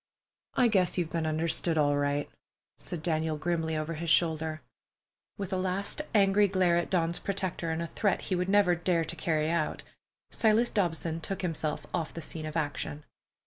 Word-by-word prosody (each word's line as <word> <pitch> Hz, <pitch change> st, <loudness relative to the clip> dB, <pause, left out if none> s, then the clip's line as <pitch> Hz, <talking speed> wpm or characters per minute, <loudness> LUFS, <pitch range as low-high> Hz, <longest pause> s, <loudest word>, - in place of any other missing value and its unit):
"I 250 Hz, -, +5 dB
guess 190 Hz, -6 st, +2 dB
you've 170 Hz, -3 st, -1 dB
been 165 Hz, -2 st, -1 dB
understood 160 Hz, +1 st, +1 dB
all 145 Hz, -1 st, +3 dB
right," 145 Hz, 0 st, 0 dB, 0.5 s
said 165 Hz, -3 st, -5 dB
Daniel 160 Hz, -2 st, 0 dB
grimly 160 Hz, -1 st, -1 dB
over 155 Hz, +2 st, -2 dB
his 165 Hz, +1 st, -3 dB
shoulder. 160 Hz, -1 st, +2 dB, 0.8 s
With 195 Hz, -3 st, -4 dB
a -, -, +1 dB
last 190 Hz, +8 st, -1 dB
angry 200 Hz, 0 st, +5 dB
glare 185 Hz, -3 st, +2 dB
at 175 Hz, -, -1 dB
Dawn's 170 Hz, -2 st, +1 dB
protector, 185 Hz, -4 st, -2 dB
and 160 Hz, +1 st, -1 dB
a -, -, -2 dB
threat 195 Hz, +4 st, 0 dB
he 185 Hz, -, -2 dB
would 180 Hz, +1 st, -1 dB
never 200 Hz, -3 st, +5 dB
dare 175 Hz, -1 st, +1 dB
to 160 Hz, -, -6 dB
carry 160 Hz, -1 st, 0 dB
out, 170 Hz, -3 st, -1 dB, 0.5 s
Silas 225 Hz, +2 st, +3 dB
Dobson 165 Hz, -4 st, -1 dB
took 195 Hz, +3 st, -4 dB
himself 160 Hz, -3 st, -2 dB
off 160 Hz, -, -2 dB
the 165 Hz, -, -5 dB
scene 155 Hz, 0 st, -5 dB
of 155 Hz, +1 st, -4 dB
action. 150 Hz, -1 st, -3 dB
170 Hz, 180 wpm, -29 LUFS, 155-185 Hz, 0.8 s, I